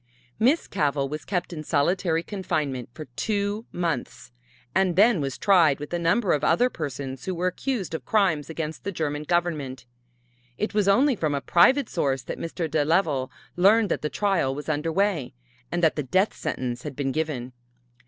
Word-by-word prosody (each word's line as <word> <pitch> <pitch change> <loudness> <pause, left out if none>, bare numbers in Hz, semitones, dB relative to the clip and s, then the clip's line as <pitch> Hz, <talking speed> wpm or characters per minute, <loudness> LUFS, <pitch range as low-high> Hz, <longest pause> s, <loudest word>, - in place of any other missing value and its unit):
Miss 265 +9 +3
Cavell 145 -5 0
was 150 +1 -6
kept 180 -2 -2
in 155 -2 -6
solitary 165 +3 +1
confinement 150 - -3
for 155 +5 -8
two 205 - -1
months 130 -8 -3 0.4
and 190 -2 +2
then 205 -2 +5
was 135 -2 -3
tried 170 -8 +4
with 150 +3 -7
a 175 - 0
number 175 +5 +2
of 150 - 0
other 245 +10 +3
persons 135 -3 -5
who 185 - -2
were 175 +2 -2
accused 190 0 -2
of 160 - -4
crimes 185 -10 +1
against 160 -1 -5
the 200 - -3
German 150 -4 -2
Government. 150 -6 -1 0.7
It 210 - -2
was 205 -2 +2
only 255 +7 +4
from 155 -7 -1
a - - 0
private 260 - +4
source 135 -6 -1
that - - -6
Mr. 165 0 -3
de 155 -1 +1
Leval 150 -5 +1 0.3
learned 205 +4 +4
that - - -1
the 150 - -2
trial 190 -10 0
was 145 - -7
under 155 +2 -1
way, 180 -9 0 0.4
and 175 0 -1
that 160 - +4
the 150 - -1
death 185 - +1
sentence 125 -1 -3
had 145 -1 -7
been 135 -1 -1
given. 135 -5 -3
165 Hz, 185 wpm, -25 LUFS, 145-195 Hz, 0.7 s, then